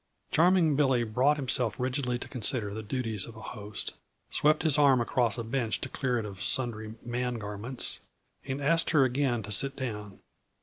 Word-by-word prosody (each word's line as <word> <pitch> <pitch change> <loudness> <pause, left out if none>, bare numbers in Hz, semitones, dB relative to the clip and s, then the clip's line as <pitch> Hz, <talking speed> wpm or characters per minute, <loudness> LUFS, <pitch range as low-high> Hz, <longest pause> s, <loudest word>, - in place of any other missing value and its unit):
Charming 170 -2 +4
Billy 135 -4 +3
brought 125 +7 +2
himself 125 -5 0
rigidly 125 -1 -1
to - - -7
consider 115 -4 0
the 110 - -4
duties 110 -2 -3
of 115 - -11
a - - -10
host; 105 -1 -5 0.4
swept 155 +1 +3
his 155 -3 +4
arm 140 -3 +6
across 120 -1 +1
a 115 - -3
bench 115 -1 -1
to - - -4
clear 125 -3 -1
it 115 - -2
of 100 -2 -8
sundry 110 -3 -1
man 125 +1 -2
garments, 110 +3 -5 0.4
and 135 +1 -4
asked 165 +3 +3
her 150 -4 +5
again 125 -3 +1
to 105 - -7
sit 135 +6 +3
down. 105 -6 -5
125 Hz, 180 wpm, -29 LUFS, 110-135 Hz, 0.4 s, arm